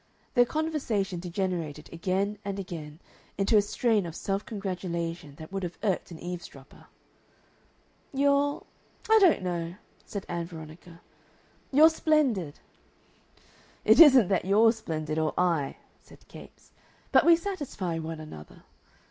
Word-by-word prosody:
Their 245 Hz, -1 st, +5 dB
conversation 240 Hz, -, -2 dB
degenerated 170 Hz, -4 st, -3 dB
again 195 Hz, +4 st, -1 dB
and 200 Hz, 0 st, -4 dB
again 165 Hz, -5 st, -7 dB, 0.4 s
into 200 Hz, +3 st, +2 dB
a 210 Hz, -, +7 dB
strain 210 Hz, -2 st, 0 dB
of 165 Hz, -, -8 dB
self 195 Hz, +2 st, -2 dB
congratulation 175 Hz, -6 st, -5 dB
that 155 Hz, +3 st, -11 dB
would 195 Hz, 0 st, -3 dB
have 175 Hz, -2 st, -5 dB
irked 195 Hz, -4 st, -1 dB
an 170 Hz, -, -9 dB
eavesdropper. 170 Hz, -6 st, -9 dB, 1.2 s
"You're 280 Hz, +1 st, +1 dB, 0.5 s
I 445 Hz, -, +8 dB
don't 360 Hz, -, +4 dB
know," 175 Hz, -1 st, -3 dB, 0.3 s
said 200 Hz, -2 st, -6 dB
Ann 170 Hz, -1 st, -3 dB
Veronica. 165 Hz, +1 st, -12 dB, 0.7 s
"You're 310 Hz, +4 st, +7 dB
splendid." 265 Hz, -, +1 dB, 1.3 s
"It -, -, +6 dB
isn't 265 Hz, -, +8 dB
that 190 Hz, -, +1 dB
you're 215 Hz, +4 st, +5 dB
splendid 155 Hz, -8 st, -4 dB
or 155 Hz, -1 st, -1 dB
I," 165 Hz, -6 st, 0 dB, 0.2 s
said -, -, -19 dB
Capes. -, -, -15 dB, 0.4 s
"But -, -, +6 dB
we 340 Hz, 0 st, +7 dB
satisfy 290 Hz, -, -4 dB
one 160 Hz, 0 st, -5 dB
another. 115 Hz, -, -11 dB
185 Hz, 130 wpm, -28 LUFS, 165-225 Hz, 1.3 s, I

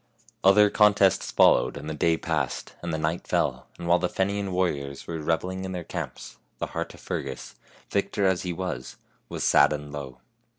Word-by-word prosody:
Other 100 Hz, +2 st, +6 dB
contests 105 Hz, -3 st, +4 dB
followed, -, -, +4 dB
and 75 Hz, +1 st, -7 dB
the 80 Hz, -, -3 dB
day 80 Hz, +2 st, +2 dB
passed, 80 Hz, -7 st, -2 dB
and 85 Hz, -, -4 dB
the 80 Hz, -, -1 dB
night 80 Hz, +2 st, -2 dB
fell, -, -, 0 dB
and 85 Hz, -, -6 dB
while 85 Hz, +1 st, +4 dB
the 90 Hz, 0 st, 0 dB
Fenian 100 Hz, 0 st, -1 dB
warriors 70 Hz, -7 st, -2 dB
were 85 Hz, -1 st, -4 dB
reveling 90 Hz, +4 st, -1 dB
in 95 Hz, 0 st, -4 dB
their 90 Hz, -1 st, -4 dB
camps -, -, -6 dB, 0.2 s
the -, -, -2 dB
heart -, -, -4 dB
of -, -, -16 dB
Fer -, -, -3 dB
gus, 65 Hz, -1 st, -8 dB, 0.4 s
victor 100 Hz, 0 st, 0 dB
as 95 Hz, -2 st, +2 dB
he 90 Hz, -, -3 dB
was, 85 Hz, -8 st, -5 dB, 0.3 s
was -, -, -4 dB
sad 70 Hz, +1 st, +5 dB
and 75 Hz, -1 st, -4 dB
low. 70 Hz, -3 st, -7 dB
85 Hz, 195 wpm, -26 LUFS, 75-95 Hz, 0.4 s, Other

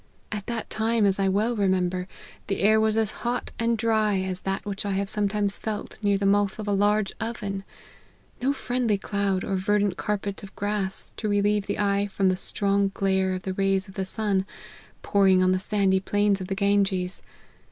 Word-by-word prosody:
At 205 Hz, -2 st, -4 dB
that 235 Hz, -2 st, -3 dB
time, 225 Hz, 0 st, +2 dB
as 195 Hz, 0 st, +2 dB
I 195 Hz, -, +2 dB
well 215 Hz, +5 st, +1 dB
remember, 185 Hz, -2 st, 0 dB, 0.4 s
the 195 Hz, -, -2 dB
air 215 Hz, +2 st, +5 dB
was 220 Hz, 0 st, +2 dB
as 220 Hz, -2 st, +1 dB
hot 245 Hz, +1 st, -2 dB
and 230 Hz, 0 st, +1 dB
dry 220 Hz, -2 st, +2 dB
as 185 Hz, -1 st, -3 dB
that 195 Hz, 0 st, -3 dB
which 200 Hz, -1 st, -4 dB
I 200 Hz, -1 st, -1 dB
have 195 Hz, +1 st, -1 dB
sometimes 205 Hz, -1 st, 0 dB
felt 215 Hz, -3 st, -5 dB
near 205 Hz, -1 st, +2 dB
the 200 Hz, -, -2 dB
mouth 200 Hz, 0 st, +2 dB
of 215 Hz, -1 st, -6 dB
a -, -, +1 dB
large 205 Hz, 0 st, +2 dB
oven; 210 Hz, -4 st, -4 dB, 0.8 s
no 265 Hz, +3 st, +2 dB
friendly 245 Hz, -5 st, 0 dB
cloud, 195 Hz, -1 st, -1 dB
or 195 Hz, -, -1 dB
ver 205 Hz, +3 st, +2 dB
dant 205 Hz, -2 st, 0 dB
carpet 205 Hz, -1 st, -2 dB
of 195 Hz, -, -11 dB
grass, 205 Hz, -2 st, -2 dB
to 215 Hz, -, -2 dB
relieve 205 Hz, 0 st, +1 dB
the 205 Hz, -, -2 dB
eye 200 Hz, -1 st, +1 dB
from 195 Hz, -1 st, +1 dB
the 185 Hz, -, +2 dB
strong 200 Hz, +1 st, +1 dB
glare 190 Hz, -1 st, +1 dB
of 185 Hz, -, -6 dB
the 190 Hz, -, -3 dB
rays 195 Hz, 0 st, +1 dB
of 190 Hz, -, -12 dB
the 190 Hz, -2 st, -3 dB
sun, 195 Hz, -1 st, -1 dB, 0.6 s
pouring 190 Hz, -2 st, +4 dB
on 185 Hz, -, +4 dB
the 185 Hz, -, +2 dB
sandy 195 Hz, -1 st, +2 dB
plains 205 Hz, 0 st, +1 dB
of 185 Hz, -, -5 dB
the 195 Hz, -, -2 dB
Ganges. 195 Hz, -2 st, +1 dB
200 Hz, 200 wpm, -26 LUFS, 195-210 Hz, 0.8 s, air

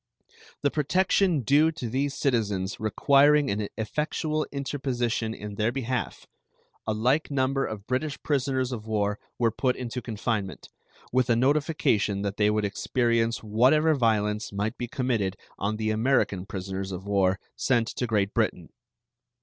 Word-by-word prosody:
The 145 Hz, -, +3 dB
protection 180 Hz, +1 st, +2 dB
due 145 Hz, +6 st, +4 dB
to 140 Hz, -6 st, -5 dB
these 135 Hz, +4 st, -1 dB
citizens 105 Hz, -8 st, 0 dB
requiring 140 Hz, +6 st, +4 dB
an 105 Hz, +1 st, -1 dB
effectual 150 Hz, +6 st, -1 dB
interposition 125 Hz, -5 st, -2 dB
in 105 Hz, 0 st, -7 dB
their 110 Hz, +3 st, 0 dB
behalf, 125 Hz, -2 st, -3 dB, 0.6 s
a 110 Hz, -, +1 dB
like 130 Hz, +8 st, +1 dB
number 135 Hz, -1 st, +1 dB
of 105 Hz, -2 st, -7 dB
British 135 Hz, +4 st, -2 dB
prisoners 130 Hz, -3 st, 0 dB
of 110 Hz, -3 st, -6 dB
war 105 Hz, -1 st, 0 dB, 0.2 s
were 115 Hz, -1 st, +2 dB
put 125 Hz, +3 st, 0 dB
into 125 Hz, 0 st, -5 dB
confinement, 110 Hz, -3 st, -3 dB, 0.4 s
with 130 Hz, 0 st, +2 dB
a 120 Hz, -, +4 dB
notification 130 Hz, -, +1 dB
that 100 Hz, 0 st, -3 dB
they 105 Hz, 0 st, +3 dB
would 105 Hz, 0 st, +1 dB
experience 115 Hz, +3 st, 0 dB
whatever 130 Hz, +9 st, +4 dB
violence 110 Hz, -5 st, +1 dB
might 105 Hz, +4 st, -2 dB
be 120 Hz, -, -4 dB
committed 115 Hz, -7 st, -1 dB, 0.2 s
on 105 Hz, +2 st, -1 dB
the 110 Hz, 0 st, 0 dB
American 110 Hz, -5 st, +1 dB
prisoners 95 Hz, 0 st, -4 dB
of 95 Hz, +1 st, -6 dB
war 95 Hz, -1 st, +2 dB, 0.2 s
sent 120 Hz, -4 st, +1 dB
to 125 Hz, -, -3 dB
Great 105 Hz, -2 st, 0 dB
Britain. 105 Hz, -7 st, -1 dB
115 Hz, 145 wpm, -27 LUFS, 105-135 Hz, 0.6 s, due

